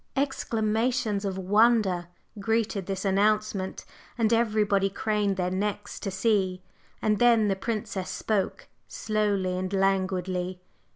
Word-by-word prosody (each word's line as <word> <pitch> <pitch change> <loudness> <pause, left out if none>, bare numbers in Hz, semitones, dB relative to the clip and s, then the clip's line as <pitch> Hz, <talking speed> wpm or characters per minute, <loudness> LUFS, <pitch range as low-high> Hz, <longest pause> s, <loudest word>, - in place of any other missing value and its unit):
Exclamations 225 -4 0
of 190 -1 -2
wonder 200 -2 +3 0.3
greeted 220 -2 -1
this 195 0 -3
announcement, 200 0 +1 0.3
and 230 -1 +2
everybody 210 -4 +2
craned 205 -1 0
their 180 -1 -1
necks 200 +2 -3
to 200 - -3
see. 190 -2 0 0.4
And 210 -1 +2
then 230 -3 +5
the 195 - +1
Princess 195 -2 -3
spoke, 210 -3 -2 0.2
slowly 205 -4 -1
and 185 0 -3
languidly. 185 -2 0
200 Hz, 115 wpm, -27 LUFS, 190-215 Hz, 0.4 s, then